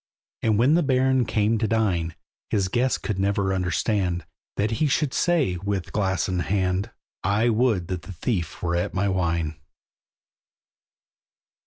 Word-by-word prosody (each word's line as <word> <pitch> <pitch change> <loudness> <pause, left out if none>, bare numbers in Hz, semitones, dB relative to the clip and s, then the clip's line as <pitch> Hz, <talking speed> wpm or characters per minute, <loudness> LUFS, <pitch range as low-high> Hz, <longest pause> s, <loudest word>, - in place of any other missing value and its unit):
And 110 -2 +2
when 125 +7 +4
the 170 - +4
Baron 130 -3 +2
came 110 +1 +1
to 110 - +1
dine, 90 -7 0 0.3
His 100 -3 +1
guests 125 +5 +1
could 105 -5 -3
never 100 0 +1
understand, 90 -2 0 0.3
That 105 +3 +1
he 155 - +4
should 140 0 +1
say, 155 - +2
with 95 0 -3
glass 95 -3 0
in 90 -1 -1
hand, 95 +2 0 0.3
"I 105 +5 +2
would 110 -6 +2
the 90 -1 -3
thief 90 -3 -3
were 85 -1 0
at 85 - -1
my 100 +2 +1
wine!" 85 -4 0
100 Hz, 145 wpm, -24 LUFS, 90-115 Hz, 0.3 s, when